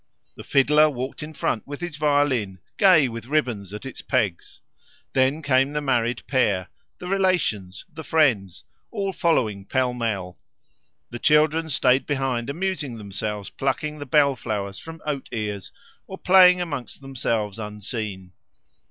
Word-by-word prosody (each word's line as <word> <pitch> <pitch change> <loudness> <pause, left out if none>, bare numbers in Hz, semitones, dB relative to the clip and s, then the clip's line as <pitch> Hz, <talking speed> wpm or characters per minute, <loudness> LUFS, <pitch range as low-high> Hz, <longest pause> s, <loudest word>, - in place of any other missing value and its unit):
The - - -10
fiddler 150 +3 +4
walked 130 0 -5
in 150 +1 -6
front 115 -7 -2
with 145 0 -6
his 175 -4 -5
violin, 145 -10 +1 0.2
gay 180 -8 +6
with 115 -1 -7
ribbons 120 -10 -1
at 105 +5 -8
its 135 - -7
pegs. 95 -5 -2 0.5
Then 135 +4 +2
came 135 0 +2
the 150 - 0
married 120 -4 0
pair, 100 -8 +1 0.3
the 180 - -8
relations, 180 - 0
the 160 +1 -8
friends, 120 - +1 0.3
all 195 -1 -3
following 115 - +1
pell 125 +4 0
mell; 105 -7 -3 0.7
the 120 - -6
children 155 +3 +3
stayed 130 -2 +2
behind 135 -4 -1
amusing 160 -6 -3
themselves 105 0 -5
plucking 150 +3 -2
the 145 - -7
bell 140 0 +4
flowers 100 -4 -4
from 165 -1 -10
oat 145 -3 -3
ears, 105 -3 -4 0.4
or 190 - -8
playing 180 -1 +6
amongst 145 -7 -5
themselves 115 -6 -2
unseen. 105 -3 -5
130 Hz, 145 wpm, -24 LUFS, 105-150 Hz, 0.7 s, gay